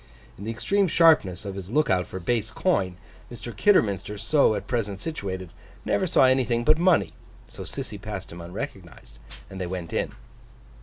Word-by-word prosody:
In 100 - -9
the - - -3
extreme 195 - +1
sharpness 155 - +4
of 100 - -4
his 95 -1 -7
look 150 +3 +2
out 90 -1 +1
for 95 - -6
base 110 +4 -1
coin, 100 - 0 0.3
Mr. 120 0 -8
Kidderminster, 105 - +2
as 105 +8 -6
at 140 -7 +4
present 105 -5 -2
situated, 95 - -5 0.3
never 190 - +1
saw 155 - +4
anything 125 -2 +2
but 155 +5 +4
money; 180 -1 +3 0.3
so - - -11
Sissy 105 0 -6
passed 105 -3 -6
him 85 +1 -9
unrecognised, - - -8 0.3
and 95 -1 -8
they 90 - -2
went 90 -2 -5
in. - - -1
105 Hz, 170 wpm, -25 LUFS, 95-140 Hz, 0.3 s, sharpness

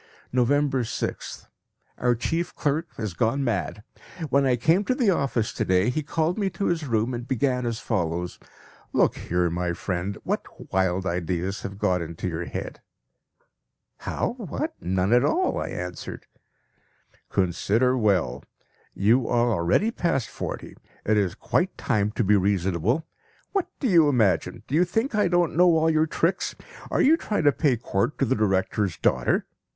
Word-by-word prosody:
November 135 +2 +2
6th. 115 - -4 0.5
Our 120 0 +2
chief 165 +9 -2
clerk 155 +3 0
has 110 -5 -3
gone 120 +9 0
mad. 105 -3 -2 0.5
When 140 0 +3
I 125 - +3
came 160 - +3
to 255 - +1
the 240 -6 +3
office 135 - 0
to - - -1
day 95 +5 +2
he 155 - -1
called 160 +5 -1
me 200 -2 +1
to 195 - -3
his 165 -4 0
room 115 +1 0
and 120 +1 -5
began 125 -1 0
as 115 -1 -2
follows: 90 -4 -2 0.5
"Look - - +3
here, 90 0 0
my 85 0 -1
friend, 90 +3 -3
what - - -5
wild 95 0 +1
ideas 90 +1 -2
have 100 0 -6
got 90 -3 +1
into 85 +2 -5
your 85 0 -3
head?" - - -6 1.2
"How! - - -2
What? - - -3
None 95 +4 +1
at 125 +1 +5
all," 365 - +1
I - - -3
answered. 90 -2 -6 1.0
"Consider 105 +7 +1
well. 95 - +1 0.5
You 115 +5 +3
are 120 0 +2
already 100 - +2
past 165 - -1
forty; - - -6 0.3
it 110 - +3
is 100 -4 +1
quite - - 0
time 105 -1 +1
to 120 - 0
be 105 +1 +4
reasonable. 100 - +1 0.5
What 390 -3 0
do 270 - 0
you 165 -7 +5
imagine? 110 - +1
Do - - -8
you 165 +4 +5
think 225 +9 -1
I 210 -3 +3
don't 175 -2 +1
know 175 -1 +5
all 160 +1 +3
your 155 0 +2
tricks? 165 +3 0 0.3
Are - - +1
you 315 +4 +5
trying 210 - -2
to 145 - +6
pay 140 -3 +1
court 110 +4 -1
to 135 - +2
the - - +1
director's 95 -2 0
daughter? - - +1
120 Hz, 165 wpm, -25 LUFS, 95-155 Hz, 1.2 s, to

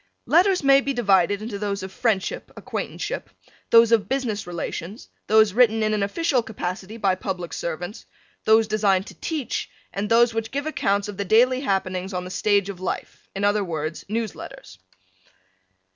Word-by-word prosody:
Letters 365 +1 +3
may 275 0 +6
be 275 0 -2
divided 200 -3 +2
into 215 -3 -5
those 200 -1 -2
of 190 - -6
friendship, 205 -2 -1
acquaintanceship, - - -5 0.4
those 230 0 +6
of 215 -3 +3
business 240 -7 -2
relations, 175 +4 -6 0.2
those 220 -2 +5
written 225 -1 +4
in 215 0 +1
an 210 - 0
official 255 +6 +1
capacity 195 -1 -5
by 195 -4 +2
public 185 -2 -4
servants, 175 +5 -5 0.4
those 220 +1 +5
designed 200 -3 +2
to - - -11
teach, 305 -7 -3 0.2
and 200 +2 -3
those 235 0 +4
which 225 0 -2
give 285 +4 -3
accounts 200 -10 0
of 205 -2 -7
the 200 - -1
daily 250 +6 +4
happenings 190 -4 -2
on 180 - -2
the 180 - -8
stage 200 0 +2
of 200 -3 -7
life, 185 - -5
in 195 - -3
other 205 0 +2
words, 160 -3 -4
news 220 -1 -2
letters. 95 0 -11
210 Hz, 170 wpm, -23 LUFS, 190-230 Hz, 0.4 s, may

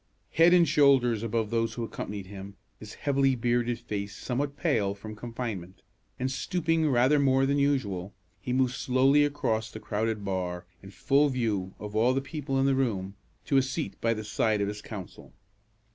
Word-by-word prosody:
Head 165 +2 +5
and 175 -2 +6
shoulders 135 -6 +4
above 115 -1 -1
those 115 -1 0
who 120 - -3
accompanied 105 -3 -6
him, 100 +1 -9 0.2
his 110 -1 -10
heavily 135 -2 +1
bearded 120 0 0
face 100 -4 -5
somewhat 140 +3 -3
pale 105 - 0
from 110 +1 -9
confinement, 110 -6 -6 0.3
and 130 +1 -2
stooping 165 +3 0
rather 130 +3 +4
more 135 -1 +3
than 140 +1 +1
usual, 105 -10 0 0.3
he 125 - -4
moved 130 0 +2
slowly 135 +4 +3
across 115 -6 -1
the 110 - -9
crowded 110 -1 -2
bar, 90 -2 -3 0.2
in 100 - -11
full 140 +8 +2
view 110 -8 -2
of 105 0 -8
all 120 +4 +3
the - - +2
people 135 -1 -3
in 135 - +2
the 135 - +3
room, 105 -8 -1 0.3
to 140 - +2
a - - +6
seat 135 +4 -3
by 115 0 +1
the 110 - -5
side 105 0 0
of 100 - 0
his 105 0 -6
counsel. 100 -5 -9
120 Hz, 180 wpm, -28 LUFS, 105-135 Hz, 0.3 s, and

